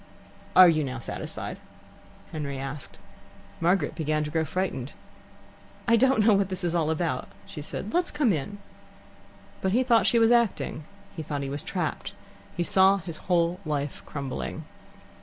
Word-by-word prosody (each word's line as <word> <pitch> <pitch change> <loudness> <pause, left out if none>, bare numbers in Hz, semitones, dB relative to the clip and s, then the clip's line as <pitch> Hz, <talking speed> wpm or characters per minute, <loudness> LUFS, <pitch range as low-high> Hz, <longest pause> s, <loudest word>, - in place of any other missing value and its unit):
"Are 185 0 +10
you 155 -2 +3
now 130 -2 -4
satisfied?" 120 - -5 0.7
Henry 140 -3 -4
asked. 135 +1 -7 0.6
Margaret 170 -2 +2
began 155 -1 -1
to 150 - -5
grow 160 0 +1
frightened. 150 -5 -3 0.9
"I 230 - +6
don't 255 -2 +4
know 220 - +6
what 195 -1 +1
it 185 0 -3
is 170 -1 +1
all 165 -3 +1
about," 160 +1 -1 0.2
she 150 - -8
said. 190 +7 -6
"Let's 350 0 +2
come 290 -8 +2
in." 170 +7 -4 1.0
But 190 0 0
he 250 +3 +4
thought 235 -3 +4
she 235 - +4
was 230 0 +5
acting. 230 -9 +1 0.3
He 165 - -4
thought 145 -2 -3
he 135 - -4
was 145 0 -2
trapped. - - -3 0.4
He 175 - +1
saw 190 +3 +5
his 165 -4 -6
whole 175 0 +2
life 145 -2 -3
crumbling. 140 +2 -5
170 Hz, 160 wpm, -27 LUFS, 150-200 Hz, 1.0 s, Are